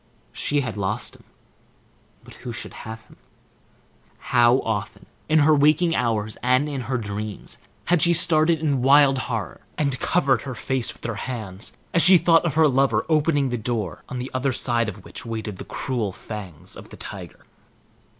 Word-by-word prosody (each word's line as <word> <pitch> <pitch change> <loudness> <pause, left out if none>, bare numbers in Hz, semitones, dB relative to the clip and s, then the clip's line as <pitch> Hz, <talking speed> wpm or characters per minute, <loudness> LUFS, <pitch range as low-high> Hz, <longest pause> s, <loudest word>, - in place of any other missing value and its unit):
She 145 -1 0
had 125 -5 -5
lost 105 +4 -2
him, - - -19 1.0
but - - -14
who 125 -1 -6
should 115 - -7
have 110 0 -9
him? - - -20 1.0
How 120 -1 +3
often, 110 -1 -4 0.2
in 155 - +4
her 155 +1 +5
waking 155 +3 +3
hours 110 -3 -1
and 130 +4 +2
in 140 -3 -4
her 130 - +1
dreams, 105 -1 -5 0.3
had 175 -2 +2
she 175 - +5
started 165 0 +3
in 140 -5 +1
wild 135 0 +5
horror, 110 -8 -4 0.2
and 140 -3 0
covered 135 -9 +2
her 130 -3 -6
face 130 +1 -1
with - - -19
her 115 - -2 0.2
hands 110 -4 -6 0.2
as 170 - +4
she 180 +2 +9
thought 165 0 +4
of 160 -4 -1
her 160 -1 +5
lover 130 -5 +2
opening 150 -3 +2
the 120 -1 -2
door 110 -5 -3
on 130 - -5
the 125 +2 -5
other 130 +1 0
side 120 -2 +2
of 100 -1 -10
which - - -5
waited 110 -3 -5
the - - -8
cruel 120 -7 -3
fangs 90 -4 -7
of - - -12
the - - -12
tiger! - - -9
125 Hz, 180 wpm, -23 LUFS, 110-145 Hz, 1.0 s, she